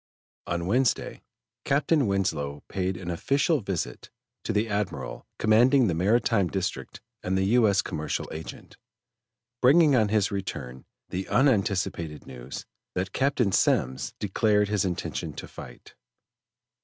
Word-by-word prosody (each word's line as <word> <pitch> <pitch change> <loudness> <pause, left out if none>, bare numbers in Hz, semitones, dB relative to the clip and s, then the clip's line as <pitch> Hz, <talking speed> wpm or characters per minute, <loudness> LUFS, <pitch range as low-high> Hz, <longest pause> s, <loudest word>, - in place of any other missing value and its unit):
On 85 -1 -2
Wednesday, 125 +5 0 0.4
Captain 145 -1 +2
Winslow 75 -7 -1
paid 95 -1 -2
an 90 -1 -5
official 140 - +1
visit 95 -6 -4 0.3
to - - -2
the 105 +1 +1
Admiral 105 -1 -3
commanding 120 +5 +4
the 95 - +1
Maritime 100 +3 +2
District 95 0 -4 0.2
and 95 +1 -1
the 95 - +1
U. 120 -3 +5
S. 100 0 +2
Commercial 75 -1 -3
Agent, 80 0 -9 0.8
bringing 145 +2 +6
on 110 -4 +3
his 105 -2 +1
return 65 -10 -5 0.2
the 95 +1 -4
unanticipated 95 - +1
news 65 +1 -8 0.3
that 95 +1 -2
Captain 135 -6 +1
Semmes 65 -7 +1
declared 105 0 +1
his 105 -1 +1
intention 90 -2 -3
to - - -8
fight. - - -12
100 Hz, 130 wpm, -26 LUFS, 85-115 Hz, 0.8 s, bringing